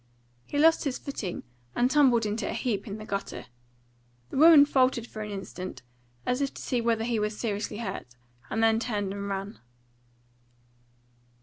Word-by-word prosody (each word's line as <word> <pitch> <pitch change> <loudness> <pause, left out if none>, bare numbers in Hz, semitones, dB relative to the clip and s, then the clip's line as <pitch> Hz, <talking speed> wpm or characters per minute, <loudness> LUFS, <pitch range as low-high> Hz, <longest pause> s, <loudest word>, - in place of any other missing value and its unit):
He 290 - -3
lost 325 +2 +5
his 270 -3 -1
footing 210 -10 -5 0.3
and 250 +2 +2
tumbled 255 -6 +4
into 210 +2 -2
a - - -2
heap 220 -4 -2
in 205 0 -5
the 215 - -8
gutter. 200 -1 -4 0.9
The - - -4
woman 310 -1 +9
faltered 255 -4 +2
an 215 -1 -4
instant, 190 -5 -7 0.4
as 250 +2 0
if 275 - 0
to - - -8
see 245 -2 0
whether 230 -1 +1
he 230 -1 0
was 210 0 -2
seriously 210 -2 -2
hurt, 170 - -6 0.3
and 225 +2 0
then 225 0 +4
turned 205 -5 -2
and 200 0 -5
ran. 195 +2 -4
225 Hz, 165 wpm, -28 LUFS, 205-255 Hz, 0.9 s, woman